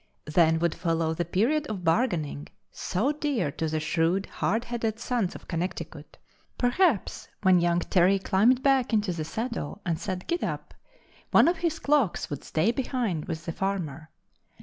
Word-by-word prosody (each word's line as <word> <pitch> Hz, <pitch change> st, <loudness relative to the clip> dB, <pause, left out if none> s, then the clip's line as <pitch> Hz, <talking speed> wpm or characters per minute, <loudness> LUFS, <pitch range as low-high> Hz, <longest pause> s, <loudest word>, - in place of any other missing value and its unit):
Then 160 Hz, +1 st, +3 dB
would 170 Hz, 0 st, +1 dB
follow 165 Hz, -2 st, 0 dB
the 170 Hz, +1 st, -2 dB
period 250 Hz, -, +1 dB
of 200 Hz, -7 st, -5 dB
bargaining, 165 Hz, -, 0 dB, 0.2 s
so 215 Hz, +10 st, -1 dB
dear 285 Hz, -, -1 dB
to 160 Hz, -, -3 dB
the 155 Hz, 0 st, -1 dB
shrewd, 165 Hz, +5 st, +1 dB
hard 225 Hz, +4 st, -1 dB
headed 230 Hz, -2 st, -2 dB
sons 235 Hz, -7 st, -1 dB
of -, -, -11 dB
Connecticut. 175 Hz, +2 st, -5 dB, 0.4 s
Perhaps 245 Hz, -, +1 dB, 0.2 s
when 185 Hz, -2 st, +6 dB
young 175 Hz, 0 st, +2 dB
Terry 185 Hz, +2 st, +3 dB
climbed 215 Hz, +7 st, +3 dB
back 270 Hz, -3 st, +3 dB
into 210 Hz, -4 st, +2 dB
the 160 Hz, -2 st, -3 dB
saddle 220 Hz, -, -4 dB
and 165 Hz, -3 st, -1 dB
said 185 Hz, -3 st, -4 dB
"Gid 345 Hz, -, -1 dB
dap," -, -, -4 dB, 0.6 s
one -, -, +6 dB
of 345 Hz, +1 st, +2 dB
his 325 Hz, -1 st, -1 dB
clocks 285 Hz, -, +1 dB
would 145 Hz, -, -5 dB
stay 165 Hz, +8 st, +1 dB
behind 240 Hz, -, -2 dB
with 160 Hz, -3 st, -5 dB
the 165 Hz, -, -2 dB
farmer. 165 Hz, -5 st, -3 dB
190 Hz, 165 wpm, -27 LUFS, 165-245 Hz, 0.6 s, when